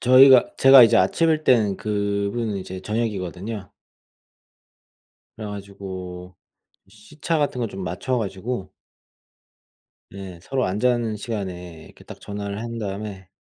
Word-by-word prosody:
저희가 130 +1 +7
제가 135 -2 +9
이제 115 - +4
아침일 155 - +2
때는 110 -8 +3
그분은 100 +1 -2
이제 95 0 -7
저녁이거든요. 100 -1 -4 1.7
그래 110 - -6
가지고 95 -3 -8 0.5
시차 145 +11 -4
같은 145 -4 -1
거 115 - -1
좀 95 -2 -7
맞춰 95 +9 -2
가지고 105 0 -4 1.4
네 95 -2 -9
서로 130 +6 -1
안 95 +3 -2
자는 120 -2 +1
시간에 90 -7 -6
이렇게 - - -17
딱 - - -12
전화를 100 0 -5
한 115 0 -5
다음에 100 -2 -6
105 Hz, 265 characters per minute, -23 LUFS, 95-120 Hz, 1.7 s, 제가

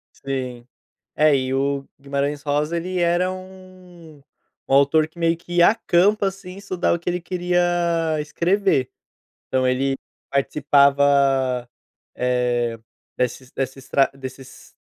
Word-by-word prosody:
Sim. 130 -3 -5 0.5
É, 150 -2 +4
e 130 0 -2
o 140 0 -1
Guimarães 140 +1 -2
Rosa 150 +3 -1
ele 180 +2 -3
era 175 +2 +2
um 185 -4 -12 0.5
um - - -4
autor 140 +3 +4
que 160 +2 -20
meio 165 0 +2
que 175 +1 -2
acampa 205 0 +3
assim, 195 -1 -9
estudar 185 -3 -1
o - - -2
que 175 - -3
ele 180 0 -2
queria 175 0 -1 0.6
escrever. 170 -1 +1 0.6
Então, 130 -1 +1
ele 135 +1 0 0.3
participava, 140 -3 +3 0.5
eh, 120 -2 0 0.4
desses 125 +1 -2
desses 135 0 -4
estra 135 +1 +2
desses 130 -1 -11
145 Hz, 120 wpm, -22 LUFS, 135-175 Hz, 0.6 s, É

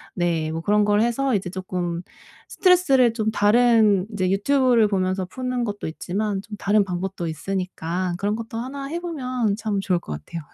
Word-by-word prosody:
네. 165 -3 0
뭐 165 +1 -3
그런 210 +2 +2
걸 210 0 +3
해서 240 +2 +1
이제 185 -2 -2
쪼끔 180 -2 -3 0.5
스트레스를 275 - +4
좀 220 -2 -1
다른 215 -2 +4
인제 185 -3 0
유튜브를 240 +2 +3
보면서 185 -1 0
푸는 250 +4 -3
것도 205 -5 -4
있지만 195 +5 -3
좀 210 +1 -9
다른 205 +1 +3
방법도 180 -1 -4
있으니까 180 +1 -3
그런 205 +3 -1
것도 225 0 -6
1 275 +4 -5
해 335 +4 -3
보면 255 - -2
참 215 -2 -2
좋을 180 -3 +1
것 75 - -7
같아요. 75 - -7
205 Hz, 335 characters per minute, -23 LUFS, 185-240 Hz, 0.5 s, 스트레스를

